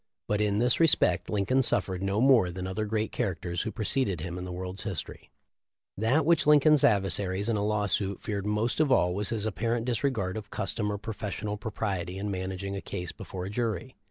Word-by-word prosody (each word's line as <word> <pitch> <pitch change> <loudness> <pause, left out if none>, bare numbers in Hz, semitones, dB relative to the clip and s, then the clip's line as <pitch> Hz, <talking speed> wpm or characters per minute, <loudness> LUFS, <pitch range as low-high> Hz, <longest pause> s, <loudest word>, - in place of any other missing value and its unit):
But 105 0 +1
in 105 -1 +1
this 120 +2 +2
respect 115 - +3
Lincoln 105 +6 +2
suffered 95 -6 0
no 100 +2 0
more 125 -8 +5
than 90 +1 -5
other 95 +3 -2
great 110 +1 -1
characters 85 -2 -2
who 110 - -3
preceded 110 - -1
him 85 +2 -5
in 90 - -5
the 90 - -6
world's 90 +1 -5
history. 95 -7 -5 0.7
That 130 +9 +2
which 165 -2 +3
Lincoln's 150 -1 +6
adversaries 95 0 +2
in 115 - +1
a 100 - 0
lawsuit 105 -2 0
feared 100 -1 -3
most 105 +5 0
of 155 -3 +3
all 90 -8 +4
was 100 +1 +3
his 110 -2 -1
apparent 115 +2 -1
disregard 115 -6 -1
of 105 -1 -7
custom 105 +1 -2
or 105 - -2
professional 105 0 -4
propriety 100 -4 -3
in 100 +1 -3
managing 95 +1 -4
a 100 - -4
case 90 -1 -4
before 90 -1 -7
a 95 - -5
jury. 110 -5 -2
105 Hz, 195 wpm, -28 LUFS, 95-115 Hz, 0.7 s, Lincoln's